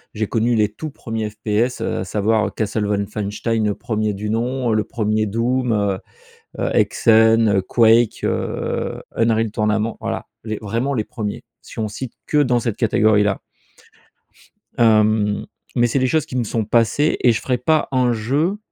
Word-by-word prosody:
J'ai 110 0 -1
connu 115 +2 +1
les 105 -1 +2
tout 155 +7 -7
1ers 110 -4 -4
FPS 110 +3 -1
à - - -2
savoir 105 +1 0
Castle 105 -1 -1
Wolfenstein, 105 +2 -2
le 105 - +1
1er 110 -3 -2
du 105 +2 -4
nom, 120 +2 -1
heu, - - +2
le 110 - +1
1er 110 -1 -1
Doom, 120 +4 0
heu, 100 -2 0 0.6
heu, - - -1
Hexen, 110 -1 +4
heu, 95 - +1
Quake, 115 +2 +3
heu, - - -2
Unreal 115 -1 +2
Tournament, 105 +1 0
voilà, 115 0 -4 0.2
les 110 -2 -3
vraiment 115 +6 -2
les 110 -4 -1
1ers 105 -3 -5 0.2
si - - -13
on 110 - -1
cite 120 +4 -7
que 150 - +1
dans 125 -4 +3
cette 115 -3 -2
catégorie-là 110 -4 +2 1.4
hem, 110 -2 +3 0.3
mais 120 0 +3
c'est 135 +4 0
des 130 - +2
choses 155 +2 +1
qui 130 - -8
me 120 - +1
sont 110 0 -2
passées 115 +7 +2
et 120 - +5
je 110 - -1
ferai 125 -2 0
pas 155 +5 +1
un 125 -2 +2
jeu, 140 - 0
110 Hz, 170 wpm, -20 LUFS, 105-120 Hz, 1.4 s, et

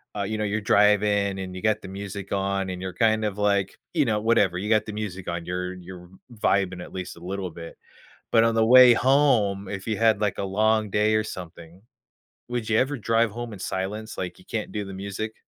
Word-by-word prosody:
uh, 100 - -2
you 110 +2 -3
know, 105 - -2
you're 105 +1 -1
driving 100 -1 +3
and 95 -1 -6
you 95 - -7
got 110 -1 +1
the - - -9
music 100 0 -7
on 95 -1 -1
and 90 0 -6
you're 95 -1 -5
kind 110 +2 +2
of 105 -1 -3
like, 100 -2 0 0.2
you 155 - +3
know, 110 -2 +1
whatever, 105 -5 +2
you 100 +3 -4
got 110 -1 +3
the 105 - -6
music 95 -4 -5
on, 85 -1 -4
you're 90 +1 -3
you're 90 -1 -11 0.2
vibing 95 -4 0
at - - -12
least 90 -2 -6
a - - -12
little 95 +1 -5
bit, 85 0 -10 0.5
but 115 - +5
on 115 - +2
the 110 - +3
way 125 +1 +8
home, 115 -7 +2
if 100 +1 -6
you 110 - -1
had, 110 -2 +3
like, 105 -3 0
a - - -1
long 110 +2 +1
day 105 +2 +2
or 110 - +2
something, 85 -2 -9 0.7
would 120 -2 -3
you 110 - +3
ever 135 +4 +1
drive 115 -1 +1
home 120 0 -6
in 100 - -10
silence, 105 +4 -4
like, 90 - -5
you 90 - -18
can't 110 -2 -4
do 105 -1 -4
the 95 - -8
music? 100 +3 -5
100 Hz, 230 wpm, -25 LUFS, 95-110 Hz, 0.7 s, way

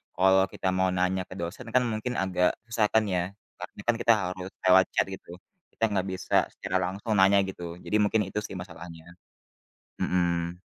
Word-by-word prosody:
kalau 95 +1 +4
kita 95 - -5
mau 95 0 +2
nanya 90 0 0
ke - - -10
dosen 85 +3 -6
kan 125 - +5
mungkin 115 +1 -2
agak 90 -1 +1
susah 115 -2 +1
kan 110 - +5
ya. 90 - +1 0.4
Karena - - -8
kan 120 - +4
kita 115 - +5
harus 95 -2 -4 0.2
lewat 95 0 +6
chat - - +4
gitu. 90 -2 -9 0.4
Kita - - -5
nggak 95 -1 0
bisa 95 -1 -3 0.2
secara - - -2
langsung 95 +5 -3
nanya 100 +1 +5
gitu. 85 -3 -6
Jadi - - -2
mungkin 105 +1 +2
itu 95 +2 -3
sih 95 - -8
masalahnya, 85 -2 -9 1.0
mhm. 85 -1 0
95 Hz, 180 wpm, -27 LUFS, 90-100 Hz, 1.0 s, lewat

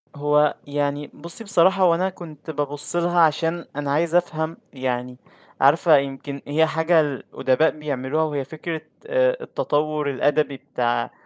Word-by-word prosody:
هو 150 +1 +2
يعني 145 0 -2
بُصّي 170 +8 -8
بصراحة 190 -2 +3
هو 170 -2 +5
أنا 185 +3 0
كنت 160 -4 -11
بابُصّ 145 +2 -2
لها 175 0 +2
عشان 165 +2 +1
أنا 145 -1 -2
عايز 165 +3 +1
أفهم 165 -2 0 0.2
يعني 125 -1 -3 0.4
عارفة 150 +2 +5
يمكن 140 0 -4
هي 155 +2 +3
حاجة 160 +1 +3
الأدباء 135 0 0
بيعملوها، 150 0 -2
وهي 145 -3 -2
فكرة 160 +1 -5 0.3
آآ - - +2
التطوّر 150 - -1
الأدبي 145 +1 +1
بتاع 125 -3 -2
150 Hz, 140 wpm, -23 LUFS, 140-165 Hz, 0.4 s, هو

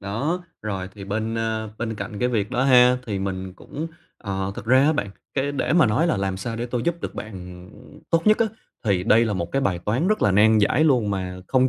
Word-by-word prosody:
đó. 135 - -2 0.2
Rồi 95 -3 -3
thì 100 - -9
bên, 110 +3 -2
a, 110 -1 -2
bên 115 -1 -3
cạnh 100 0 -6
cái 125 - +1
việc 105 -5 -1
đó 125 - 0
ha, 125 -1 +6
thì 100 -3 -2
mình 95 -1 -4
cũng, 155 +10 -6 0.3
ờ, 95 0 -3
thực - - -7
ra 130 +3 +5
á 155 - +4
bạn, 105 -10 -2 0.2
cái 140 +1 0
để 145 - -1
mà 170 -5 +5
nói 110 +11 +2
là 165 - +1
làm 95 -1 -1
sao 115 +4 -4
để 120 - -3
tôi 120 -1 -2
giúp 170 0 -1
được - - -5
bạn, 110 0 -7 0.4
ừm, - - -15
tốt 165 +2 +2
nhất 215 0 +5
á, 230 - +3 0.4
thì 95 -4 +2
đây 115 +4 +5
là 110 - -1
một 85 -3 -3
cái 135 - +1
bài 90 -3 0
toán 115 - 0
rất 215 - +1
là 105 - +4
nan 110 +3 +5
giải 130 +9 +3
luôn, 125 -9 +3
mà 90 -1 -3
không 130 0 +3
110 Hz, 250 wpm, -23 LUFS, 100-130 Hz, 0.4 s, ha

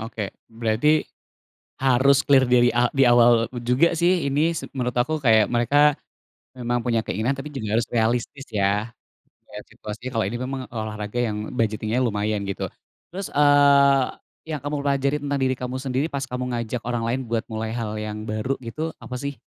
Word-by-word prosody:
oke, 110 0 -5 0.4
berarti 115 +6 +1 0.9
harus 135 +1 +4
clear 135 -2 +5
dari 125 0 +4
a 120 +1 +3
di 135 -1 +4
awal 120 -1 +5
juga 125 +8 +3
sih 175 -2 +2
ini, 155 +5 +2
s - - -4
menurut 125 -1 -2
aku 155 +6 0
kayak 110 -4 +5
mereka 145 +5 +4 0.6
memang 120 0 -1
punya 115 -2 +1
keinginan 120 +7 -1
tapi 135 +2 -6
juga 110 -5 -2
harus 115 - +1
realistis, 120 +4 -1
ya. 105 +2 0 0.6
Melihat - - -10
situasinya, 110 +4 -7
kalau 110 - +1
ini 110 +5 -3
memang 130 +1 -4
olahraga 110 0 -5
yang 105 -2 -3
budgeting 110 -2 -1
nya 125 - +2
lumayan, 105 -2 -1
gitu. 100 - -3 0.5
Terus, 195 0 -4
eee, 140 -2 +5 0.5
yang 150 -3 -3
kamu 145 0 -3
pelajari 140 0 +1
tentang 140 -1 -1
diri 130 0 +1
kamu 125 0 -5
sendiri 130 +2 -1
pas 140 -1 -2
kamu 125 0 -3
ngajak 115 0 -3
orang 120 -1 -2
lain 125 +3 -1
buat 115 0 -2
mulai 110 0 -4
hal 115 -2 -3
yang 105 0 -5
baru 110 +6 -2
gitu, 155 +7 -5
apa 125 - -7
sih? 140 +2 -5
125 Hz, 175 wpm, -23 LUFS, 110-140 Hz, 0.9 s, clear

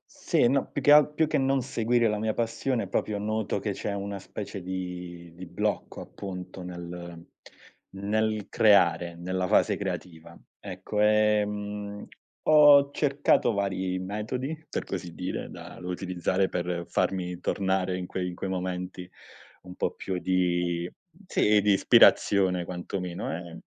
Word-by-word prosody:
Sì, - - +2
no 135 +2 0
più 145 - -3
che 145 +3 +6
alt 150 0 +6
più 160 - +2
che 155 - +1
non 135 0 +2
seguire 120 -2 +1
la 105 0 0
mia 110 +1 -1
passione, 115 -1 -1
proprio 105 +2 -1
noto 110 0 -2
che - - -2
c'è 100 - -4
una 100 0 -4
specie 100 0 -7
di 90 -2 -6
di 90 +1 -9
blocco 105 +5 -3
appunto 95 -1 -8
nel 85 -1 -8 0.6
nel 105 +2 -1
creare, 90 -5 +3
nella 90 +1 -2
fase - - +3
creativa. 80 -3 -6 0.2
Ecco, 105 -1 -4
ehm, 105 -1 +1 0.4
ho 145 -2 +7
cercato 140 -5 +2
vari 95 -2 -1
metodi, 110 +10 -4
per - - -3
così 90 -3 -5
dire, 90 - -4
da - - -10
da 90 - -8
utilizzare 90 +1 -1
per 90 -1 -3
farmi 90 -2 -1
tornare 95 -1 0
in 90 - -4
quei 90 -1 -3
in 90 - -8
quei 95 - -4
momenti 90 -1 -4 0.5
un 90 0 -11
po' - - -1
più 95 -2 -4
di 90 -1 0 0.4
sì, 105 - +3
di 100 0 +4
ispirazione 95 -2 +5
quantomeno, 90 0 -5
ehm 85 -1 -8
95 Hz, 145 wpm, -27 LUFS, 90-105 Hz, 0.6 s, ho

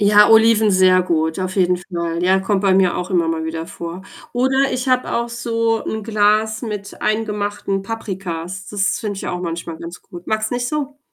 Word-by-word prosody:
Ja, 205 0 +6
Oliven 220 -1 +6
sehr 185 -1 +5
gut, 160 -2 0
auf 185 0 -3
jeden 180 -1 +3
Fall. 170 -2 -4
Ja, 190 +1 +4
kommt 195 0 0
bei 190 -1 +4
mir 185 -2 +3
auch 180 +2 -4
immer 170 -3 +2
mal 160 -1 -1
wieder 160 0 -4
vor. 170 +3 -7 0.3
Oder 265 +2 +2
ich 255 +1 -2
habe 255 0 +1
auch 235 0 0
so 230 -1 -1
'n 220 0 -3
Glas 215 +1 +2
mit 210 -3 -6
eingemachten 205 -2 -1
Paprikas. 190 -4 -5
Das 205 -1 0
finde 205 -2 -4
ich - - -5
auch 180 0 -3
manchmal 170 -1 -4
ganz 170 +2 -9
gut. 175 0 -12
Magst 215 0 -1
nicht 245 0 -1
so? 285 0 -3
200 Hz, 195 wpm, -19 LUFS, 180-220 Hz, 0.3 s, Ja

